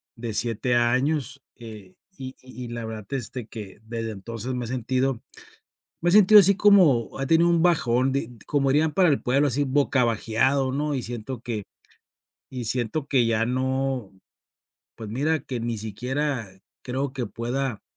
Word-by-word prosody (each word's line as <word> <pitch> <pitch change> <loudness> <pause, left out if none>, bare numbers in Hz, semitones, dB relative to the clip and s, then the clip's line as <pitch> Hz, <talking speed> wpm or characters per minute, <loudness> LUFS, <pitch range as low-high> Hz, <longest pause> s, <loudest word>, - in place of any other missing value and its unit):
de 115 -1 -5
7 120 +2 0
años, 135 +3 +1
eh, 110 -6 -11 0.2
y 130 0 -8
y 130 0 -10
y - - -7
la 120 -1 -5
verdad 110 -2 -7
desde 130 -3 -5
que 105 -3 -9
desde 115 0 -4
entonces 115 +4 -5
me 125 - -3
he - - -6
sentido 130 +1 -1 0.8
me 175 - 0
he 175 - +3
sentido 210 0 +8
así 200 0 +5
como, 180 - +4
he 135 - -1
tenido 165 +3 +4
un 170 -1 +3
bajón, 135 -7 +2
di 135 -4 -2
d 120 -4 -16
como 140 -2 +1
dirían 150 +3 +2
para 180 -4 +4
el 140 - +1
pueblo 140 +4 +2
así 140 +2 +1
bocabajeado, 130 -1 +1
¿no? 145 +1 -1
Y 130 - -2
siento 120 +1 -6
que 110 -4 -4 0.9
y 125 -2 -5
siento 125 +5 -1
que 130 -4 +3
ya 115 -1 +1
no 130 -2 -1 0.8
pues, 110 -2 -8
mira 150 +6 0
que 130 -1 -5
ni 115 0 -3
siquiera 125 +3 -3 0.3
creo 130 +2 -3
que 130 -3 -3
pueda 120 +2 -3
130 Hz, 170 wpm, -24 LUFS, 115-140 Hz, 0.9 s, sentido